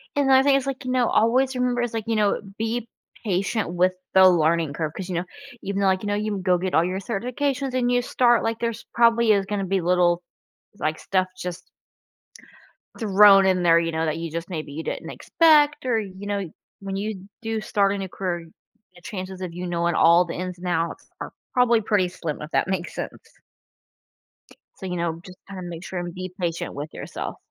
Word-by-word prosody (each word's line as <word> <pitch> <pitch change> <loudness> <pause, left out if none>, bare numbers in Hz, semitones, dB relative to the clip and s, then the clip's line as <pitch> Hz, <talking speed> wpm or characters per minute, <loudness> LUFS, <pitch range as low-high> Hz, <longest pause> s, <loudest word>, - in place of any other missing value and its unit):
And 285 -1 +2
the - - +6
other 265 0 +6
thing 280 0 +4
is, 275 0 0
like, 275 0 -4
you 255 - -3
know, 250 -2 +2
always 255 +4 +2
remember 250 -1 0
is, 240 -1 -2
like, 225 -1 -2
you 225 -1 +1
know, 205 -1 +2 0.2
be 225 +1 -2 0.4
patient 200 0 -1
with 180 +1 +2 0.2
the 190 0 +8
learning 165 -3 +2
curve. 155 0 -3
'Cause 190 - -5
you 180 - -2
know, 170 - 0 0.4
even 200 0 -2
though, 195 - +3
like, 190 +1 +1
you - - -3
know, 205 - 0
you 210 -1 -2
go 185 -1 +2
get 185 +1 -3
all 165 - +5
your 185 +2 -2
certifications 255 +6 -2
and 250 -1 +1
you 245 0 +3
start, 240 -1 +3
like, 225 0 -1
there's 230 -1 -3
probably 235 -1 +4
is 200 -2 +3
gonna 200 0 -2
be 190 0 0
little, 175 0 +2 0.6
like, 155 0 -1
stuff 185 -1 0
just 180 -1 -7 1.3
thrown 200 -2 +7
in 185 -1 +2
there, 170 -1 +6
you 165 0 -1
know, 160 0 0
that 155 0 -1
you 165 0 -4
just 170 +3 -5
maybe 155 -5 -5
you 160 +2 -5
didn't - - -5
expect 300 -4 +3
or, 245 -3 +2
you 200 -1 -7
know, 200 -3 -2 0.3
when 195 0 -5
you 200 -2 -5
do 225 -1 -2
start 200 -2 +1
a - - -3
new 195 -1 -5
career, 175 -3 -4 0.5
the 175 - -16
chances 185 0 -6
of 180 -2 -5
you 180 +1 -5
knowing 170 -1 0
all 170 +2 +5
the 170 - -6
ins 180 0 -5
and 180 - -6
outs 165 -1 -2
are - - -5 0.2
probably 240 -2 +4
pretty 205 -4 +1
slim 170 -4 -5
if 150 +2 -8
that - - +1
makes 185 -2 -3
sense. - - -6 1.6
So, - - -8
you 180 - -3
know 170 -1 -2
just 185 -1 -12
kinda 195 -1 -8
make 175 -1 -7
sure, 185 - -4
and 175 -1 -5
be 185 0 -7
patient 170 -2 -2
with 145 +2 -7
yourself. - - -6
190 Hz, 215 wpm, -24 LUFS, 175-225 Hz, 1.6 s, the